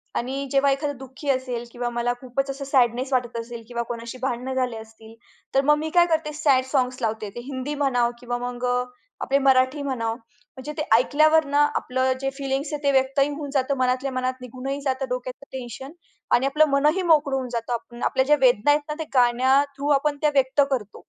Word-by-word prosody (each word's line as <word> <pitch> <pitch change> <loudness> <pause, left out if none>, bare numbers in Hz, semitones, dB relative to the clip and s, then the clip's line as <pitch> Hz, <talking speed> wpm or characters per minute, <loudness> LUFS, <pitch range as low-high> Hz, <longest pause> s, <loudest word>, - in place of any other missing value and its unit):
आणि 270 +3 -2
जेव्हा 275 0 +3
एखादं 285 0 -2
दुःखी 265 +2 -8
असेल 255 -3 -1
किंवा 240 0 -3
मला 240 0 -1
खूपच 270 +2 -2
असं 275 0 -6
सॅडनेस 260 0 +1
वाटत 245 -2 0
असेल 230 0 -7
किंवा 235 -1 -3
कोणाशी 235 +1 -7
भांडण 260 0 -2
झाले 250 -3 -1
असतील 220 0 -13 0.4
तर 270 - +5
मग 300 0 +5
मी 315 +1 -3
काय 345 +1 +5
करते? 320 -2 -1
सॅड 285 -4 +3
साँग्स 255 -2 0
लावते. 220 -2 -2
ते 240 - -9
हिंदी 275 +1 -4
म्हणावं 250 -4 +1
किंवा 245 0 -3
मग 245 0 -5 0.6
आपले 275 - +2
मराठी 265 +1 +3
म्हणाव, 235 -5 -2
म्हणजे 245 +4 -12
ते 300 - 0
ऐकल्यावर 310 +5 +4
ना 290 0 +5
आपलं 260 +1 0
जे 270 - 0
फिलिंग्स 275 +2 -2
आहे, 295 - -4
ते 280 - +3
व्यक्तही 270 +1 +2
होऊन 290 -1 -6
जातं 275 0 +1
मनातल्या 255 +1 0
मनात 255 0 -2
निघूनही 265 +3 -5
जातं 265 -1 -1
डोक्यात 250 +2 -5
टेन्शन 265 +2 -7 0.4
आणि 260 - +1
आपलं 300 +3 +4
मनही 300 +6 +2
मोकळं 300 -5 +3
होऊन 255 -2 -3
जातं. 240 0 -4
आपल्या 260 - +2
ज्या 295 +2 +5
वेदना 250 +2 +4
आहेत 295 +1 +3
ना, 300 - -1
ते - - -1
गाण्या 255 +2 +4
थ्रु 280 +1 -3
आपण 295 0 -1
त्या 300 - +4
व्यक्त 270 +1 +3
करतो. 215 -6 -3
260 Hz, 195 wpm, -24 LUFS, 245-280 Hz, 0.6 s, तर